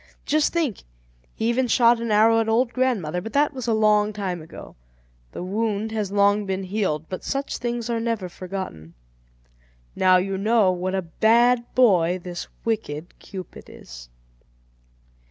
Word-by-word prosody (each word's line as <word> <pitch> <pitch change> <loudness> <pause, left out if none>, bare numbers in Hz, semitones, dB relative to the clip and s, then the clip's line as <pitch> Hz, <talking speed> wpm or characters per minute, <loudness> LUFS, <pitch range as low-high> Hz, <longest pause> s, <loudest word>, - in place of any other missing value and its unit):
Just 305 +1 +2
think, 315 - -1 0.5
he 225 - -1
even 250 +2 +1
shot 235 0 +4
an 230 0 -3
arrow 220 +2 +4
at 225 0 0
old 235 +2 +1
grandmother; 205 -11 0
but 225 - -8
that 290 +1 +2
was 255 -3 -6
a 230 - +2
long 210 -1 +3
time 190 -4 -4
ago. 160 +2 -12 0.6
The - - -6
wound 215 +2 -2
has 210 -3 -3
long 205 0 +2
been 190 0 -2
healed, 185 -6 -2
but 185 - -6
such 275 0 -3
things 240 -1 -3
are 235 -1 -1
never 225 -5 -2
forgotten. 180 - -7 1.0
Now 185 -1 +5
you 190 +1 -2
know 215 -2 +3
what 185 +1 -2
a 190 - -1
bad 235 +7 +2
boy 185 -8 +4
this 175 -1 -7 0.2
wicked 175 -8 -3
Cupid 190 -2 -10
is. - - -12
210 Hz, 155 wpm, -23 LUFS, 185-235 Hz, 1.0 s, Now